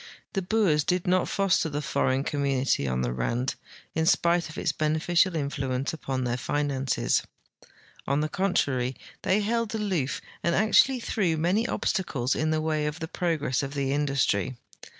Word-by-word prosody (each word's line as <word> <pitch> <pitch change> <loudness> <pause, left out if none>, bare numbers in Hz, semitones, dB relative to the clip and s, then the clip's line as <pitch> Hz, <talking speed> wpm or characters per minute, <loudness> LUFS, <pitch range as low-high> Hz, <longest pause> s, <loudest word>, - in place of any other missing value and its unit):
The 195 - 0
Boers 180 -6 +2
did 180 +2 0
not 180 0 +2
foster 195 -4 +2
the 145 0 -2
foreign 135 -2 0
com 145 -1 -2
munity 135 - +1
on 65 0 0
the - - -1
Rand, 115 - -1 0.4
in 160 0 0
spite 170 0 +3
of 155 - -10
its 160 - 0
beneficial 160 +4 +1
influence 140 -2 -2
upon 135 -4 -3
their 125 0 -1
finances. 135 -1 0 0.9
On 140 +2 +2
the 155 - 0
contrar}^, 140 -9 0 0.2
they 200 +3 +2
held 230 +1 -1
aloof, 185 -11 -1 0.2
and 170 - +1
actually 240 +4 +4
threw 180 -8 0
many 185 +9 +1
obstacles 135 - -1
in 155 +1 0
the 155 0 +1
way 155 -1 0
of 150 +2 -4
the 160 - -4
progress 160 -7 -1
of 140 0 -5
the 135 -1 0
industry. 135 -5 0
150 Hz, 165 wpm, -27 LUFS, 135-180 Hz, 0.9 s, actually